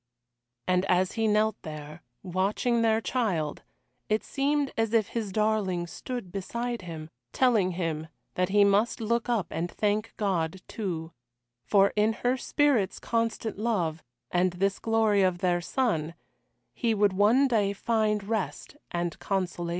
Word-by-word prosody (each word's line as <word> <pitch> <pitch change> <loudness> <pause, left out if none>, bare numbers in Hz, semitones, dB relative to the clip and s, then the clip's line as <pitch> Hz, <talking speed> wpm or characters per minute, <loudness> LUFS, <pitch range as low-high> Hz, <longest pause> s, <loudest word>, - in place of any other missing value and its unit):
And 180 0 +3
as 185 +1 +2
he 225 -1 0
knelt 215 0 +2
there, 155 +1 -8 0.2
watching 200 +6 0
their 225 -1 +3
child, 190 - -1 0.5
it 215 +1 +1
seemed 285 0 0
as 225 0 0
if 215 -3 +2
his 220 -4 -3
darling 210 -4 +1
stood 235 +2 -6
beside 235 +5 -3
him, 160 -3 -8 0.2
telling 220 -8 +3
him 165 -3 -3 0.3
that 180 0 0
he 205 +1 +5
must 200 +5 +3
look 235 +2 0
up 230 -6 +1
and 170 +2 -2
thank 210 +3 -1
God, 185 -3 -1
too 170 -6 -4 0.5
for 195 - +4
in 215 +1 +3
her 245 +3 0
spirit's 260 -6 +1
constant 230 -2 -2
love, 175 -8 0 0.3
and 180 0 +2
this 195 +2 0
glory 220 -3 +2
of 185 -2 +2
their 175 -1 +1
son, 170 - -1 0.6
he 230 -3 0
would 205 -2 +3
one 220 +8 +4
day 210 -5 +2
find 210 0 0
rest 220 +5 -3
and 175 -1 -3
consolation. 180 -3 -2
205 Hz, 145 wpm, -28 LUFS, 180-225 Hz, 0.6 s, he